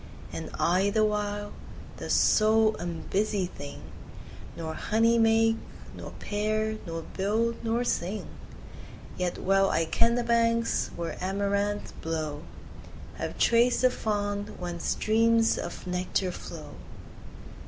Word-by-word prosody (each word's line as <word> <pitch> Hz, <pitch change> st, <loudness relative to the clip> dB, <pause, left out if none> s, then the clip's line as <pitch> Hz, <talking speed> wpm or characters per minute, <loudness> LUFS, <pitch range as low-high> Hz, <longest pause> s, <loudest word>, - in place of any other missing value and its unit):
And -, -, -5 dB
I, 185 Hz, +4 st, +3 dB
the 215 Hz, +1 st, +3 dB
while, 205 Hz, -1 st, -2 dB, 0.4 s
the -, -, -6 dB
sole 220 Hz, 0 st, +4 dB
unbusy 185 Hz, +4 st, -1 dB
thing, 145 Hz, -5 st, -9 dB, 0.7 s
5 -, -, -17 dB
Nor 160 Hz, -1 st, -4 dB
honey 230 Hz, +6 st, +2 dB
make, 225 Hz, 0 st, +4 dB, 0.4 s
nor -, -, -7 dB
pair, 215 Hz, +1 st, -1 dB
nor 165 Hz, 0 st, -4 dB
build, 220 Hz, +7 st, -1 dB
nor 230 Hz, +1 st, +1 dB
sing. 200 Hz, -2 st, -1 dB, 0.9 s
Yet 180 Hz, -1 st, -2 dB
well 195 Hz, +1 st, +3 dB
I 165 Hz, -, +1 dB
ken 230 Hz, +8 st, +2 dB
the 245 Hz, -, 0 dB
banks 230 Hz, 0 st, +2 dB
where 170 Hz, +1 st, -5 dB
amaranths 200 Hz, +2 st, -1 dB
blow, 155 Hz, -2 st, -4 dB, 0.8 s
Have -, -, -4 dB
traced 240 Hz, +2 st, +4 dB
the 255 Hz, -, +6 dB
fount 205 Hz, -2 st, -2 dB
whence 175 Hz, -1 st, -5 dB
streams 225 Hz, +1 st, +3 dB
of -, -, -6 dB
nectar 180 Hz, +1 st, -1 dB
flow. -, -, -9 dB
205 Hz, 120 wpm, -28 LUFS, 180-225 Hz, 0.9 s, the